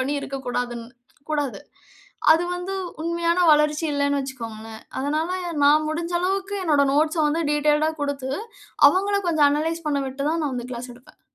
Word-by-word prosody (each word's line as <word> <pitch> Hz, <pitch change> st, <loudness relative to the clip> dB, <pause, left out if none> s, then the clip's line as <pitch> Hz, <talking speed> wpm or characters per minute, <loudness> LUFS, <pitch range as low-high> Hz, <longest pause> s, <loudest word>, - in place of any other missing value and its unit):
பண்ணி 270 Hz, +3 st, -1 dB
இருக்கக்கூடாதுன் 245 Hz, -4 st, -4 dB, 0.4 s
கூடாது. 290 Hz, -3 st, -1 dB, 0.7 s
அது 335 Hz, +2 st, +2 dB
வந்து 360 Hz, +2 st, -4 dB, 0.3 s
உண்மையான 340 Hz, +1 st, 0 dB
வளர்ச்சி 300 Hz, +1 st, +2 dB
இல்லனு 285 Hz, 0 st, +1 dB
வச்சிக்கோங்களேன். 225 Hz, -4 st, -7 dB, 0.2 s
அதனால, 305 Hz, +5 st, -1 dB, 0.3 s
நான் 305 Hz, +2 st, +5 dB
முடிஞ்ச 335 Hz, +2 st, -3 dB
அளவுக்கு 390 Hz, +2 st, -1 dB
என்னுடைய 290 Hz, -4 st, +3 dB
நோட்ஸ்ஸ 310 Hz, +2 st, +2 dB
வந்து 330 Hz, +3 st, 0 dB
டீட்டெயில்டா 300 Hz, +1 st, +2 dB
குடுத்து 275 Hz, -2 st, -3 dB, 0.6 s
அவங்கள 400 Hz, +2 st, +1 dB
கொஞ்சம் 305 Hz, -3 st, +4 dB
அனலைஸ் 320 Hz, +3 st, -1 dB
பண்ண 285 Hz, -1 st, 0 dB
விட்டு 275 Hz, +1 st, -6 dB
தான், 330 Hz, 0 st, 0 dB
நான் 285 Hz, -, -1 dB
வந்து 245 Hz, 0 st, -5 dB
கிளாஸ் 245 Hz, +1 st, -6 dB
எடுப்பேன். 250 Hz, +3 st, -20 dB
295 Hz, 150 wpm, -23 LUFS, 270-330 Hz, 0.7 s, நான்